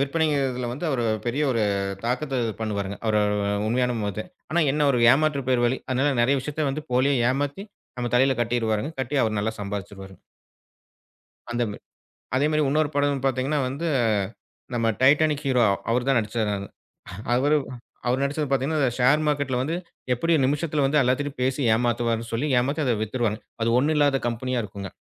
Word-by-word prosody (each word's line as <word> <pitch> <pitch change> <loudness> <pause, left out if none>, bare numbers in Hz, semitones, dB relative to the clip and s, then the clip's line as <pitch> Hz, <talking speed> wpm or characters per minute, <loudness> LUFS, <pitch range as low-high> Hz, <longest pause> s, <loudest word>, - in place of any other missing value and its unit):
விற்பனைங்கரதுல 140 -4 0
வந்து 145 +7 -4
அவர் 130 -4 0 0.2
பெரிய 130 +5 0
ஒரு 115 -3 +1 0.4
தாக்கத்த 130 +2 -1
இது 115 - -2
பண்ணுவாருங்க. 100 -2 -3
அவர் 110 -1 +2 0.5
உண்மையான 125 +1 +1
முகத்த 105 0 -3 0.3
ஆனா 170 0 +3
என்ன 150 +1 +1
அவரு 120 -4 +3
ஏமாற்றுப் 140 -2 +1
பேர்வழி. 120 0 +2
அதனால 135 +3 +1
நெறைய 135 +4 +3
விஷயத்த 150 +2 -2
வந்து 150 +3 -4
போலியா 130 +3 +3 0.2
ஏமாத்தி 145 +8 -2 0.3
நம்ம 120 -1 -2
தலையில 130 0 +3
கட்டிடுவாருங்க. 115 +3 -1
கட்டி 130 +3 -2
அவர் 110 -1 -1
நல்லா 110 +2 -1
சம்பாதிச்சிடுவாரு. 100 -1 -6 1.4
அந்த 120 0 0
மா 105 - -8 0.6
அதே 135 +3 +2
மாரி 155 0 +2
உன்னொரு 150 +1 +1
படம் 145 -1 0
பாத்தீங்கன்னா 135 +3 0
வந்து 140 +6 -3 0.9
நம்ம 115 -1 +1
டைட்டானிக் 150 +2 +4
ஹூரோ 130 -3 +2 0.3
அவர் 120 +1 +1
தான் 135 - +4
நடிச்சாருங்க 110 -1 -1
அது. 100 - -7 0.7
அவரு 145 +5 +3 0.5
அவரு 125 +2 +1
நடிச்சது 145 +2 -1
பாத்தீங்கன்னா, 135 +4 +1
இந்த 130 -4 +2
ஷேர் 135 +5 +4
மார்க்கெட்டுல 145 -4 0
வந்து 160 +5 -2 0.4
எப்படி 165 +8 +1
நிமிஷத்துல 145 +1 0
வந்து 150 +2 +3
எல்லாத்திட்டயும் 130 +2 -1
பேசி 130 +2 0
ஏமாத்துவார்னு 115 -1 0
சொல்லி 115 +6 0
ஏமாத்தி 140 +5 -1
அத 125 -3 +2
வித்துருவாங்க. 110 -1 -1 0.2
அது 115 - +1
ஒண்ணும் 150 +5 +2
இல்லாத 145 -2 +3
கம்பெனியா 125 +1 -2
இருக்குங்க. 100 -1 -7
130 Hz, 160 wpm, -24 LUFS, 120-145 Hz, 1.4 s, டைட்டானிக்